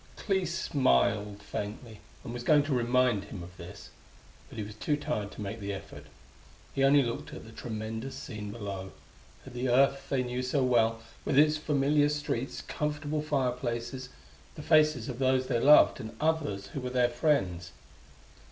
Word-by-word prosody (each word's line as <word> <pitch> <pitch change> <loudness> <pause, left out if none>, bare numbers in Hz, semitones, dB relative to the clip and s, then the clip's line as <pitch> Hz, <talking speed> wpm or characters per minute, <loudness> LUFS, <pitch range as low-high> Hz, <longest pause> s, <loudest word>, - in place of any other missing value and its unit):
Clee 190 -2 0
smiled 105 -10 +1
faintly, 105 +2 -6 0.2
and 115 - -6
was 120 - -5
going 145 +4 +4
to 145 -1 -2
remind 120 -3 +2
him 90 -5 -8
of 90 +1 -12
this; 85 +1 -10 0.6
but - - -11
he 110 - -2
was 105 +1 -8
too 145 +7 -1
tired 145 -9 -3
to - - -9
make 105 +3 -5
the 100 -1 -4
effort. 95 - -8 0.7
He 135 - +1
only 140 +1 +6
looked 120 -1 -5
at - - -9
the 110 - -12
tremendous 110 +3 -5
scene 105 -6 -7
below: 100 -4 -6 0.5
at 135 - -11
the 125 +1 -2
Earth 135 +2 +3
they 130 -2 +1
knew 125 0 -3
so 130 +2 0
well, 115 -3 +2 0.2
with - - 0
its 150 +1 +5
familiar 145 0 +2
streets, 145 -4 -3
comfortable 150 0 -2
fireplaces, 125 -3 -2 0.5
the 150 - -8
faces 155 -7 +4
of 125 -1 -5
those 130 -1 +2
they 120 - 0
loved 150 +5 +6
and 110 - -6
those - - -14
others 150 -11 0
who 140 - -5
were 125 - -3
their 125 -1 +3
friends.... 95 - 0
125 Hz, 175 wpm, -29 LUFS, 110-145 Hz, 0.7 s, only